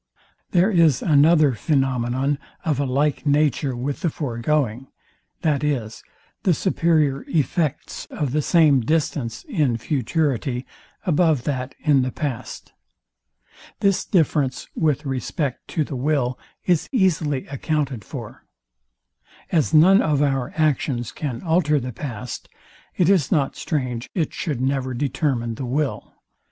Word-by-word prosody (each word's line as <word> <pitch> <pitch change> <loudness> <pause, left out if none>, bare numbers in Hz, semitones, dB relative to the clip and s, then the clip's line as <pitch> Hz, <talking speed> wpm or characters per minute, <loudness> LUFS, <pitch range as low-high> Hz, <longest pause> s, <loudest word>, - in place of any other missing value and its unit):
There 185 +4 +3
is 165 - +4
another 155 -1 +5
phænomenon 135 0 0 0.3
of 150 -4 0
a 140 - +1
like 140 +3 0
nature 145 -2 +2
with 135 +4 -3
the 170 - +1
foregoing, 130 -2 -1 0.6
viz, 140 -7 -1 0.4
the 180 -4 +2
superior 155 -7 +1
effects 155 -1 -1
of 145 -4 -3
the 150 +2 +1
same 155 -3 +4
distance 145 -2 -1
in 155 - 0
futurity 130 -1 -1 0.4
above 160 -6 +2
that 130 -2 -3
in 145 -4 +3
the 130 0 -1
past. 130 -6 -5 1.1
This 200 -2 +2
difference 150 -6 +1
with 150 -3 0
respect 135 +1 -3
to 155 - -1
the 140 - -6
will 130 -2 0 0.3
is 175 -4 +1
easily 165 - +1
accounted 140 -4 -2
for. - - -9 1.1
As 160 -4 +2
none 180 +6 +6
of 150 -2 +2
our 135 -3 0
actions 140 -6 0
can 130 -6 -5
alter 160 -3 +2
the 125 -1 -5
past, 120 -1 -6 0.5
it 175 - +3
is 180 -8 +3
not 140 -4 +1
strange 125 -6 -3
it 165 -6 -1
should 140 -7 -3
never 130 -1 -1
determine 130 -3 -1
the 130 +4 -5
will. 140 +2 -2
145 Hz, 125 wpm, -22 LUFS, 130-155 Hz, 1.1 s, none